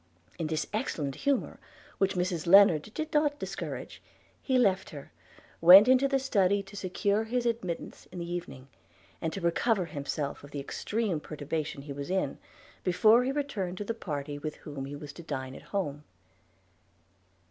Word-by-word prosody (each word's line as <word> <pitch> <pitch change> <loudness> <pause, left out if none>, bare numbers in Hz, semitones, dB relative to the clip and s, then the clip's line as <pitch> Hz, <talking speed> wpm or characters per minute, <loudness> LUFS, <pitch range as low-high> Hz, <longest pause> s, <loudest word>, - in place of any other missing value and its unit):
In 165 - -1
this 160 0 -1
excellent 140 -3 -2
humour, 280 - -1 0.4
which 195 -1 +2
Mrs 180 -2 -1
Lennard 195 -1 +6
did 315 0 -4
not 295 -1 +2
discourage, - - -6 0.4
he 260 -2 +1
left 195 -6 +2
her, 145 -4 -10 0.5
went 185 +6 +10
into 260 +2 +5
the 275 0 +2
study 200 -7 +2
to 195 +1 -13
secure 200 +3 0
his 240 +2 -1
admittance 225 -8 -3
in 180 - -9
the 170 -1 -4
evening, 135 -7 -6 0.5
and 160 - -1
to 195 - -5
recover 175 +4 +1
himself 145 -2 -4
of 145 - -11
the 145 - -5
extreme 200 +5 -2
perturbation 150 -1 -4
he 145 -1 -6
was 140 +2 -6
in, 190 +1 -1 0.4
before 215 +6 +5
he 260 - 0
returned 230 -11 -3
to 205 - -3
the 230 - -2
party 145 -8 -5
with 150 +1 -5
whom 145 -3 -7
he 140 +1 -7
was 145 0 -9
to - - -10
dine 130 -5 -5
at - - -10
home. 150 -8 -2
180 Hz, 170 wpm, -29 LUFS, 150-220 Hz, 0.5 s, went